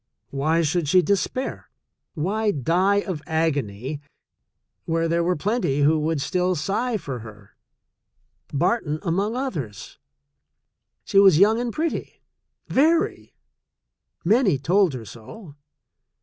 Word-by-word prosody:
Why 155 +4 +1
should 160 +1 0
she 180 +3 +5
despair? 205 +7 -2 0.5
Why 205 +7 0
die 185 +6 +2
of 180 -7 -5
agony 145 -4 -2 0.8
where 165 0 0
there 170 +1 +1
were 180 +1 +1
plenty 190 - 0
who 155 +2 +4
would 155 0 -1
still 180 +3 0
sigh 220 +8 -1
for 135 -10 -6
her 105 -2 -13 0.5
— - - -48
Barton 175 -6 +1
among 195 +5 -1
others? 160 - -5 1.0
She 195 - +3
was 195 -5 +7
young, 225 +6 +3
pretty, 320 +7 -4 0.4
very 320 +5 +1 0.4
— - - -50
many 220 - +2
told 170 +3 +2
her 115 -3 -7
so. 140 - -12
170 Hz, 120 wpm, -23 LUFS, 145-205 Hz, 1.0 s, was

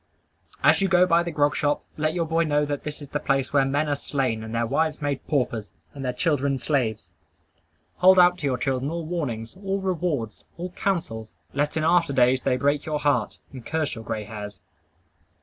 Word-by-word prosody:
As - - +5
you 195 - +3
go 180 -1 +5
by 170 -1 +4
the 170 - -3
grog 145 -2 +1
shop, 145 -1 0
let 155 +2 -1
your 170 -2 0
boy 165 +1 +1
know 150 -2 +1
that 145 -1 -3
that 150 0 -6
is 140 - -11
the 145 - -2
place 135 -1 0
where 140 -2 +4
men 145 +3 0
are 145 - +1
slain, 130 -6 -2
and 110 +1 -6
their 115 0 +1
wives 155 +5 0
made 145 -2 -3
paupers, 120 -7 -1 0.2
and 140 - -7
their 125 - 0
children 140 -2 0
slaves. 110 - -1 0.8
Hold 185 +1 +6
out 180 0 +6
to 145 - -1
your 130 -2 0
children 135 0 -1
all 170 0 -4
warnings, 135 -9 -4
all 195 0 -2
rewards, 175 - -2
all 180 +1 -5
counsels, 165 - -3 0.2
lest 145 +3 0
in 155 - 0
after 165 -2 +3
days 130 0 +4
they 125 - +1
break 145 +2 +1
your 155 -1 -2
heart, 145 -1 0
and 130 -3 -9
curse 160 +1 -2
your 115 -3 -7
gray 110 -1 -3
hairs. 105 -2 -8
145 Hz, 205 wpm, -25 LUFS, 125-165 Hz, 0.8 s, Hold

